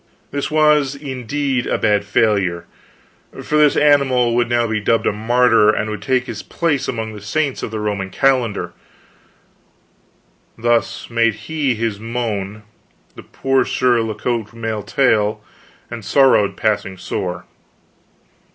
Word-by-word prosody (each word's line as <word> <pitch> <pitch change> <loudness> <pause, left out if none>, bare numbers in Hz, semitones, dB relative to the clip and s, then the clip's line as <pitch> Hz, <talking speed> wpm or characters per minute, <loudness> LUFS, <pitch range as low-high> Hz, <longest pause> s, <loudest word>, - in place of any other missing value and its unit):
This 140 0 -3
was, 150 -2 +3
indeed, 135 -1 -3
a - - 0
bad 105 -1 +1
failure, 100 -5 +1 0.8
for 150 - -2
this 150 -1 +4
animal 135 -5 +3
would 120 0 +1
now 120 0 +2
be 110 -1 -1
dubbed 110 +2 +1
a - - +3
martyr, 115 0 +3
and 110 0 0
would 105 - -5
take 130 -2 0
his - - -6
place 150 -6 -1
among 110 -2 -4
the 105 - -10
saints 140 +7 -2
of - - -4
the 110 0 -5
Roman 105 -2 -3
calendar. 120 0 0 1.8
Thus 115 -1 0
made 115 -2 +2
he 135 +3 -2
his 110 -2 -2
moan, 110 -3 -4 0.5
this - - -13
poor 135 -1 +1
Sir 125 -1 +1
La 110 -1 -3
Cote 115 -2 -3
Male 110 -2 -3
Taile, 110 -1 +1 0.5
and 115 -2 -7
sorrowed 130 -5 +3
passing 100 -3 -1
sore. - - -4
115 Hz, 140 wpm, -19 LUFS, 105-130 Hz, 1.8 s, this